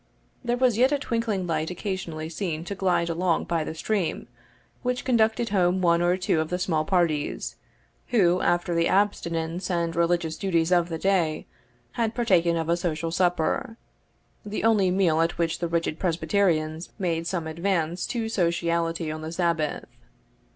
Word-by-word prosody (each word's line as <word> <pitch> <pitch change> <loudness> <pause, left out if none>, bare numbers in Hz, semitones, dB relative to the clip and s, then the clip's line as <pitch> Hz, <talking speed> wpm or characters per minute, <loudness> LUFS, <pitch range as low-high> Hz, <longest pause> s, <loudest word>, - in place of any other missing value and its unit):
There 240 0 0
was 245 -3 +2
yet 260 +3 +5
a 290 - +2
twinkling 230 -8 -1
light 160 -2 -1
occasionally 180 -4 -4
seen 165 -1 -4
to 200 - -4
glide 185 -3 +1
along 170 0 0
by 165 -2 -1
the 160 - -5
stream, 190 - -2 0.5
which 250 0 -2
conducted 230 -1 +2
home 185 -2 +2
one 170 -2 +3
or 175 +1 +2
two 180 -3 +1
of 160 0 -1
the 180 - -1
small 165 -4 0
parties, 165 -5 0 0.5
who, 185 -7 +3
after 175 0 +1
the 170 0 +2
abstinence 175 -3 0
and 170 -2 -1
religious 170 -1 +1
duties 170 -3 0
of 175 -1 +3
the 165 - -3
day, 170 -4 +1 0.5
had 230 -2 -1
partaken 175 -8 +2
of 165 -1 -2
a 170 +1 +2
social 165 -2 -2
supper 180 +6 0 0.7
the 210 +1 -4
only 215 -4 +4
meal 180 -4 +2
at 165 +1 0
which 165 0 0
the 170 - -1
rigid 165 -1 -1
Presbyterians 165 -2 0
made 170 -4 -1
some 170 -3 -2
advance 170 +1 -1
to 230 -2 -2
sociality 170 -4 0
on 155 0 -6
the 160 +1 -5
Sabbath. 165 -3 -1
175 Hz, 165 wpm, -25 LUFS, 165-195 Hz, 0.7 s, yet